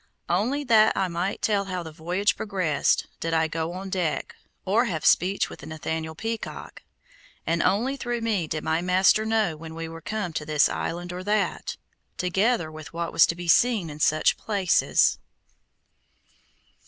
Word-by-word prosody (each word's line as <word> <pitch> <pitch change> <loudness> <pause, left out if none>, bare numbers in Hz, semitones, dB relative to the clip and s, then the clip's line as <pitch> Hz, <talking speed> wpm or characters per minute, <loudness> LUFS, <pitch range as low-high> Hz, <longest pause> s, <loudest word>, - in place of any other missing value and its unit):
Only 235 +12 +1
that 220 -4 +4
I 190 - +1
might 175 +3 -3
tell 200 -2 +1
how 185 -2 -4
the 160 - -8
voyage 175 +6 0
progressed, 185 -8 0
did 165 0 -1
I 160 0 +2
go 160 +1 -3
on 190 +1 -6
deck, 175 -5 -2 0.3
or 215 +6 +3
have 165 - -3
speech 190 +3 +3
with - - -11
Nathaniel 160 0 -4
Peacock, 225 +5 -6 0.6
and 165 0 +1
only 245 +8 +1
through 240 -2 -3
me 210 -8 0
did 155 0 -3
my 160 +1 0
master 185 +4 +3
know 220 -7 +1
when 160 +1 -9
we 165 0 -5
were 165 0 -9
come 185 -2 -3
to 155 - -3
this 150 -1 +3
island 175 +1 -4
or 180 +1 -6
that, 210 -1 -1 0.4
together 190 0 +1
with 155 0 -10
what 170 0 -3
was 150 - +6
to 170 - -1
be 175 0 -7
seen 205 -2 +3
in 150 - -10
such 155 0 +3
places. 200 -5 +2
180 Hz, 165 wpm, -25 LUFS, 160-210 Hz, 0.6 s, was